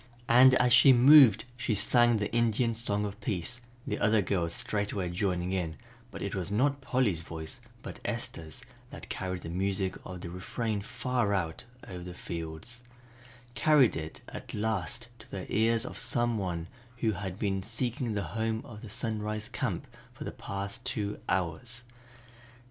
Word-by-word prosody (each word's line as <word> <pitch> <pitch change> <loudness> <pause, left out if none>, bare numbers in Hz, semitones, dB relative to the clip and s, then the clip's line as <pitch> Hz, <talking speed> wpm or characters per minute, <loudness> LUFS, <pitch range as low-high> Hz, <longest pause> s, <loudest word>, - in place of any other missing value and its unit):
And 130 +2 +8
as 125 -1 +4
she 130 +2 +9
moved 130 -3 +8
she 120 -3 -1
sang 120 +3 +4
the 105 0 -2
Indian 115 0 +2
song 105 -2 -1
of 100 -1 -6
peace, 105 +5 -3 0.2
the - - -2
other 110 -1 +3
girls 85 -3 0
straightway 100 -1 -2
joining 90 -1 0
in, 85 -4 -2 0.3
but - - -7
it 100 - -3
was 95 -2 -2
not 135 +7 +1
Polly's 125 -10 +1
voice 80 -1 -7 0.2
but - - -7
Esther's 80 -3 -4 0.3
that - - -10
carried 90 -1 -3
the 80 - -6
music 95 +1 -1
of 90 -1 -7
the 85 - -6
refrain 105 +4 -2
far 125 -2 0
out 85 +4 -2 0.2
over 90 -2 -7
the 90 0 -8
fields, 85 +9 -6 0.7
carried 135 +1 +5
it 80 0 -6
at - - -7
last 110 +2 -1
to 110 - -15
the 95 -2 -5
ears 115 +2 +3
of - - -6
some 120 -2 0
one 85 -4 -2 0.3
who 115 -2 +1
had 95 -1 -5
been 95 -2 0
seeking 115 +2 -2
the 100 - 0
home 110 0 -1
of 105 -3 -10
the 115 - -9
Sunrise 110 -1 -2
Camp 125 -1 -2 0.3
for 150 - -7
the - - -4
past 100 +4 -5
two 110 -6 -2
hours. 95 +7 -1
105 Hz, 165 wpm, -30 LUFS, 95-120 Hz, 0.7 s, she